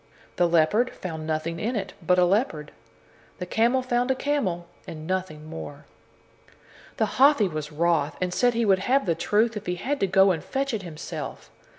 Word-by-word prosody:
The 175 - +4
leopard 170 +9 +3
found 160 -3 -6
nothing 160 +1 -2
in 235 +6 -2
it 195 -3 -3
but 180 +2 +2
a 180 - +5
leopard. 175 - 0 0.7
The 180 - -5
camel 235 +7 +2
found 245 0 0
a 265 - +2
camel, 225 -13 -1 0.2
and 155 -1 -8
nothing 180 -4 -3
more. 150 -2 -8 1.1
Then 220 -4 +2
Hathi 265 -2 +4
was 155 -3 -5
wroth, 155 -2 +1
and 180 -1 -1
said 245 +4 +2
he 230 0 +1
would 190 -2 +4
have 260 +6 +1
the 170 - +2
truth, 220 +7 +1
if 210 - -6
he 180 - -1
had 280 +10 -2
to 195 - +1
go 190 +1 +5
and 160 -4 -3
fetch 275 -1 -2
it 215 - -2
himself. 165 -4 -7
185 Hz, 190 wpm, -25 LUFS, 165-235 Hz, 1.1 s, a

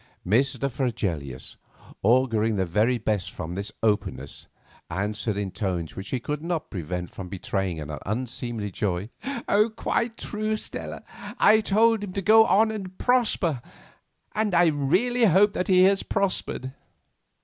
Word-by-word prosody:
Mr. 135 +7 +2
Fregelius, 95 - -3 0.4
auguring 115 -1 +3
the 95 -2 +1
very 105 +8 +2
best 105 -4 -1
from 85 0 -6
this 100 +3 -4
openness, 105 -10 -1 0.4
answered 105 +3 -2
in 100 -2 -2
tones 90 -6 -3
which 95 - -6
he 130 - -1
could 150 +5 -4
not 165 -1 -3
prevent 90 -1 -4
from 95 -2 -8
betraying 95 -2 -2
an 75 0 -5
unseemly 115 -1 -3
joy. 95 +2 -2 0.6
"Quite 230 0 -1
true, 215 +1 -2
Stella; - - -6 0.3
I 220 +1 +6
told 220 +1 +3
him 190 -3 -6
to 195 - -2
go 220 +3 +7
on 220 +2 +4
and 190 -4 -6
prosper; 210 - +2 0.7
and 210 -3 0 0.4
really 245 +6 +3
I 220 - +7
hope 200 +4 +4
he 185 -1 +6
has 195 0 +4
prospered." 160 -8 -1
120 Hz, 140 wpm, -25 LUFS, -, 0.7 s, go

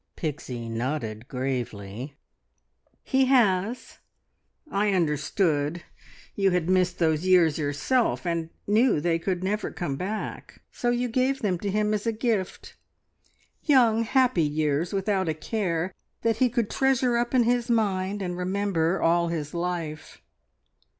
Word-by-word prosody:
Pixie 135 -7 -4
nodded 115 -1 -3
gravely. 125 -2 -4 0.9
"He 265 0 +2
has. 230 -3 +1 0.7
I 205 0 +1
understood. 155 -1 0 0.5
You 195 -1 +2
had 180 -2 0
missed 185 -1 +2
those 160 +1 +1
years 170 -4 +4
yourself, 150 - 0
and 170 -2 -1 0.2
knew 220 - +3
they 165 +1 +1
could 180 +1 -2
never 205 +2 -1
come 145 -7 -4
back, 205 +6 -5
so 240 - -1
you 245 +1 +1
gave 260 +3 0
them 185 -4 0
to 200 - -3
him 210 +1 +1
as 210 +2 -2
a - - +3
gift 215 -4 -2 0.9
young, 240 -7 +4
happy 255 -4 +2
years 150 +1 0
without 195 -2 0
a 155 - -1
care, 180 -1 -2 0.3
that 225 -1 +2
he 250 +1 +3
could 235 -3 -1
treasure 260 -2 +2
up 240 +2 0
in 245 - +5
his 240 +1 +1
mind 200 -3 0
and 180 -1 -3
remember 185 -2 0
all 170 +1 +3
his 155 -3 -4
life. 170 -3 -4
185 Hz, 135 wpm, -26 LUFS, 160-225 Hz, 0.9 s, in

